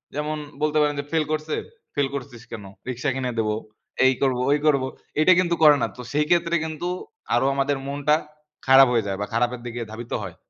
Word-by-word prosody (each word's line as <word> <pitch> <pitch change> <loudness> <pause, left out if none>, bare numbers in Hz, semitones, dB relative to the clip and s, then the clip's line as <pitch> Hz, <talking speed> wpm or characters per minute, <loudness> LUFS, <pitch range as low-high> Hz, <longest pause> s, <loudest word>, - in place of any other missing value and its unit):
যেমন 150 +1 -2 0.2
বলতে 155 0 +1
পারেন 145 0 +1
যে, 140 - -2
ফেইল 160 -2 +1
করছে? 155 0 -1 0.4
"ফেইল 145 -1 +2
করছিস 125 -4 -7
কেন? 110 -3 -6 0.3
রিকশা 125 +3 -2
কিনে 125 -2 -2
দেব, 110 - +1 0.6
এই 130 - +6
করব, 130 -3 +2
ওই 145 - +4
করব"। 140 -3 +3 0.4
এটা 185 +4 +7
কিন্তু 175 -2 +2
করে 150 -1 +9
না। - - +2
তো 125 - -7
সেই 150 +1 +1
ক্ষেত্রে 170 -1 +2
কিন্তু 160 +2 -4 0.5
আরও 120 +3 +2
আমাদের 140 +1 +1
মনটা 145 +2 +2 0.5
খারাপ 135 0 +8
হয়ে 115 -3 +1
যায় 95 -1 -2
বা - - 0
খারাপের 120 +1 0
দিকে 120 0 -5
ধাবিত 115 +2 -8
হয়। 90 -4 -7
140 Hz, 200 wpm, -24 LUFS, 120-150 Hz, 0.6 s, করে